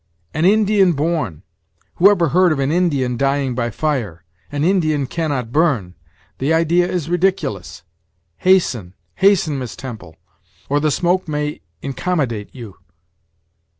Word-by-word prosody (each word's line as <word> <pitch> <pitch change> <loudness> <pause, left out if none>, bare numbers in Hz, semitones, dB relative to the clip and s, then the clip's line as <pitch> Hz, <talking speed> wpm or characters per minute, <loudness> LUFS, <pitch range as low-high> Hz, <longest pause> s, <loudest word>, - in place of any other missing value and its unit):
"An 155 +3 0
Indian 200 -2 +4
born! 145 - -2 0.5
who 190 +3 +7
ever 175 -6 +2
heard 180 +3 +4
of 155 - 0
an 135 +1 0
Indian 140 -8 +1
dying 135 0 0
by 120 -1 -1
fire? 115 - -3 0.3
An 145 0 -2
Indian 155 -6 +1
cannot 140 -5 -3
burn; 125 - +1 0.5
the 135 +4 0
idea 165 +2 +2
is 170 -4 -2
ridiculous. 175 - -1 0.5
Hasten, 125 - +1 0.2
hasten, 190 -7 +3
Miss 125 -3 -6
Temple, 110 -11 -9 0.5
or 145 +1 +2
the 155 +1 +1
smoke 175 +5 0
may 150 0 -3 0.2
incommodate 135 - -2
you." 115 -7 -10
150 Hz, 130 wpm, -19 LUFS, 125-175 Hz, 0.5 s, who